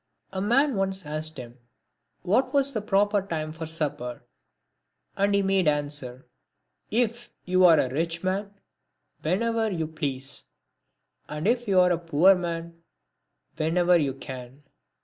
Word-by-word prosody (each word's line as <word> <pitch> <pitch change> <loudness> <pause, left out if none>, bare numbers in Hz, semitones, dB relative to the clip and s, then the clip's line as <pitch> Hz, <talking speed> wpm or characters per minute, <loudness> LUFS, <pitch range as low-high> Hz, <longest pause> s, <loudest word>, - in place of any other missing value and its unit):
A 190 - -2
man 265 +6 +2
once 190 -2 0
asked 155 +1 -3
him 125 0 -10 0.6
what 255 +9 +1
was 275 0 +3
the 215 - -2
proper 205 0 +2
time 160 -5 -4
for 160 0 -6
supper, 150 -6 -2 0.9
and 200 +1 +2
he 200 - +2
made 195 -3 +2
answer, 145 -4 -1 0.3
" - - -52 0.2
If 235 +1 -1 0.2
you 185 0 +4
are 165 -3 +7
a - - +2
rich 165 +3 -2
man, 195 +2 -2 0.7
whenever 225 +6 0
you 165 -5 -2
please; 140 -4 -5 0.8
and 150 +5 -3
if 240 0 +1
you 190 -2 +4
are 180 0 +5
a 170 - +1
poor 170 +3 +5
man, 170 -2 -5 0.8
whenever 175 +3 +3
you 140 -5 +1
can." 130 +1 -9
175 Hz, 145 wpm, -26 LUFS, 150-200 Hz, 0.9 s, are